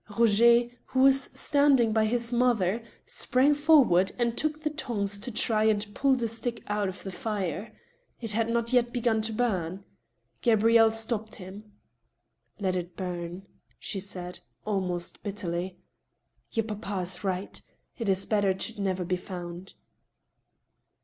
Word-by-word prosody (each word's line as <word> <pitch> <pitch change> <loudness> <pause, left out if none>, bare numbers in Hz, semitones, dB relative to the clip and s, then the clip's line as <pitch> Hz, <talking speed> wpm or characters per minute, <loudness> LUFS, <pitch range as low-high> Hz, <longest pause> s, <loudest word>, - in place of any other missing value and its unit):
Roger, 235 +1 +5 0.2
who 260 - 0
was 270 0 +6
standing 275 -7 +4
by 220 -1 +3
his 235 +1 +1
mother, 235 -4 +2 0.2
sprang 265 +4 +2
forward, 285 - +4
and 235 -1 0
took 310 +2 -2
the 305 - +1
tongs 205 -9 -2
to 235 - -4
try 215 -1 +1
and 205 -1 +1
pull 275 +2 +3
the 240 -2 -1
stick 230 +1 -4
out 205 -1 -1
of 190 - -9
the 195 - -5
fire. 200 0 -3 0.5
It 225 -3 -5
had 225 +2 0
not 235 +1 0
yet 240 -1 +3
begun 235 -2 +1
to 220 +1 -1
bum. 195 -5 -1 0.6
Gabrielle 225 -1 +5
stopped 220 -1 -3
him. 200 +2 -11 0.4
" 120 0 -45
Let 190 -2 0
it 175 -1 -5
bum," 180 0 -5 0.3
she 195 - -3
said, 180 -2 -4 0.3
almost 185 -4 -2
bitteriy. 185 -3 -4 0.4
" - - -46
Your 225 -1 0
papa 205 -3 -4
is 180 +2 -4
right. 190 0 -3 0.4
It 225 -4 -1
is 190 0 +3
better 205 -2 +2
it 190 0 -1
should 225 -1 -5
never 190 -2 -1
be 180 +1 0
found." 180 0 -8
215 Hz, 155 wpm, -28 LUFS, 185-235 Hz, 0.6 s, was